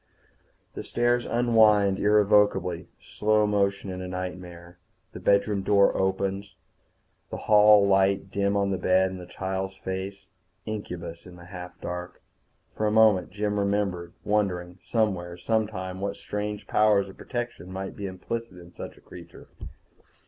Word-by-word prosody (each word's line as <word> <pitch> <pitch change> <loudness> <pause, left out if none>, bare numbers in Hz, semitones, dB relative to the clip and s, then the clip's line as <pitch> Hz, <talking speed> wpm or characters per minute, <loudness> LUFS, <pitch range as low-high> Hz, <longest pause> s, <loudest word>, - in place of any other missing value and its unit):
The - - -6
stairs 120 0 0
unwind 110 -5 +4
irrevocably, 105 -4 +3
slow 105 0 +1
motion 100 -2 0
in 90 0 -6
a 90 - -5
nightmare. 90 -1 -7 0.3
The - - -9
bedroom 100 +2 +2
door 100 0 +3
opens, 95 +1 -1 0.7
the - - -5
hall 105 -1 +7
light 95 0 +2
dim 100 0 0
on 100 -1 +1
the 95 - -1
bed 95 +1 +3
and 95 - -7
the 90 - -10
child's 95 +1 -4
face. 95 +1 -5 0.4
Incubus 90 -6 -6
in 90 - -12
the 85 -1 -13
half 90 -1 -9
dark. 90 0 -6 0.6
For 110 - 0
a - - +1
moment 110 -4 +4
Jim 105 +1 -2
remembered 100 -4 -1
wondering 95 -4 -1
somewhere, 95 -6 -1
sometime, 95 -2 -2
what 100 0 -2
strange 105 0 -5
powers 105 -2 +3
of 95 - -12
protection 120 -7 -5
might 95 +1 -5
be 100 - -5
implicit 95 +3 -6
in 90 0 -14
such - - -9
a - - -18
creature. - - -13
100 Hz, 145 wpm, -26 LUFS, 90-105 Hz, 0.7 s, hall